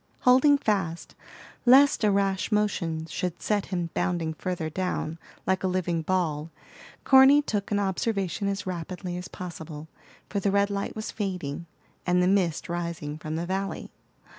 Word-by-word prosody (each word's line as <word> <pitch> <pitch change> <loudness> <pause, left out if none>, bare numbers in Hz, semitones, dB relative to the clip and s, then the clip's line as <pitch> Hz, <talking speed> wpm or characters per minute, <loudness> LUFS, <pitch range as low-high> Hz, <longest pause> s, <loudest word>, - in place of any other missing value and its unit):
Holding 260 +3 +6
fast, 190 -9 -1 0.5
lest 265 +1 +6
a 210 - +5
rash 195 0 +1
motion 180 -7 0
should 175 +1 -4
set 205 -2 0
him 175 -3 -3
bounding 170 -3 -1
further 175 -1 -3
down, 165 -1 -3 0.3
like 190 0 0
a - - +2
living 180 -2 0
ball, 160 -3 -1 0.5
Corny 270 +2 +7
took 205 -7 -2
an 205 - +1
observation 195 -1 -1
as 200 -1 -2
rapidly 180 0 -5
as 180 0 -5
possible, 160 -3 -8 0.4
for 205 - -2
the 200 - +1
red 200 +1 +2
light 200 0 -3
was 215 0 -4
fading, 180 -6 -4 0.4
and 180 0 +2
the 180 - +3
mist 185 -5 +1
rising 170 -3 -4
from 155 0 -4
the 165 +2 -2
valley. 195 +2 -3
185 Hz, 155 wpm, -27 LUFS, 170-200 Hz, 0.5 s, Corny